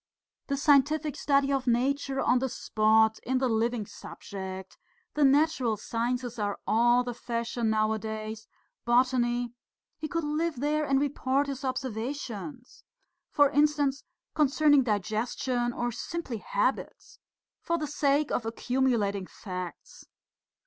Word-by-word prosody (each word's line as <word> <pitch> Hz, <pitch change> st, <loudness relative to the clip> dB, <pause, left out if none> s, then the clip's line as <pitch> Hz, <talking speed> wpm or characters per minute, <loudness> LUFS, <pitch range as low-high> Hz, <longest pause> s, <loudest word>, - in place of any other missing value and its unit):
"The 280 Hz, -, -1 dB
scientific 295 Hz, +1 st, +3 dB
study 280 Hz, -1 st, +2 dB
of 270 Hz, -1 st, -1 dB
nature 270 Hz, +3 st, +1 dB
on 255 Hz, -, +3 dB
the 265 Hz, +1 st, -1 dB
spot, 220 Hz, 0 st, +2 dB
in 260 Hz, +2 st, -1 dB
the 260 Hz, 0 st, +1 dB
living 230 Hz, -1 st, 0 dB
subject. 190 Hz, -1 st, -8 dB, 0.3 s
The 300 Hz, -, +1 dB
natural 275 Hz, -5 st, +3 dB
sciences 240 Hz, +2 st, -3 dB
are 205 Hz, -1 st, -1 dB
all 240 Hz, +2 st, +4 dB
the 245 Hz, -1 st, -4 dB
fashion 235 Hz, -1 st, -2 dB
nowadays, 220 Hz, 0 st, -2 dB, 0.4 s
botany.... 240 Hz, -1 st, +2 dB, 0.5 s
He 310 Hz, -, -3 dB
could 335 Hz, 0 st, -2 dB
live 310 Hz, +2 st, -1 dB
there 300 Hz, +2 st, 0 dB
and 275 Hz, -1 st, +2 dB
report 280 Hz, -1 st, 0 dB
his 275 Hz, -1 st, -5 dB
observations.... 255 Hz, 0 st, -5 dB, 0.5 s
For 290 Hz, -2 st, +4 dB
instance, 290 Hz, -2 st, +2 dB, 0.3 s
concerning 295 Hz, -1 st, +4 dB
digestion 240 Hz, +3 st, -1 dB
or 240 Hz, 0 st, -2 dB
simply 270 Hz, 0 st, -5 dB
habits. -, -, -2 dB, 0.4 s
For 335 Hz, -1 st, 0 dB
the 305 Hz, -, -2 dB
sake 290 Hz, 0 st, +1 dB
of -, -, 0 dB
accumulating 225 Hz, -4 st, 0 dB
facts." 180 Hz, -4 st, -8 dB
250 Hz, 120 wpm, -28 LUFS, 225-285 Hz, 0.5 s, all